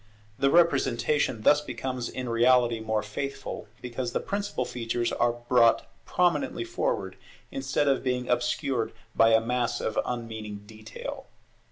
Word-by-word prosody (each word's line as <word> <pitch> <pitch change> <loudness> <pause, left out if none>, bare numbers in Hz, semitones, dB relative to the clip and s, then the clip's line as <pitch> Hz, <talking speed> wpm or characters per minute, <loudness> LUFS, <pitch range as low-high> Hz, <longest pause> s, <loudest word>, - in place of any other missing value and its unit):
The 140 - +4
representation 140 -6 +2
thus 150 +5 +5
becomes 125 -2 -4
in 130 -1 -5
reality 120 0 +4
more 110 -1 -1
faithful, 135 +7 -5 0.2
because 125 0 -4
the - - +1
principal 200 -10 -2
features 120 0 -2
are 120 -1 +2
brought 120 -1 +3 0.2
prominently 180 - +1
forward, 475 +8 -2 0.3
instead 270 - 0
of 135 -1 +3
being 125 -1 -1
obscured 120 -1 0 0.2
by 115 0 +5
a - - +6
mass 120 +1 -1
of 110 - -1
unmeaning 110 -4 -5
detail. 110 0 -8
120 Hz, 135 wpm, -27 LUFS, 115-135 Hz, 0.3 s, a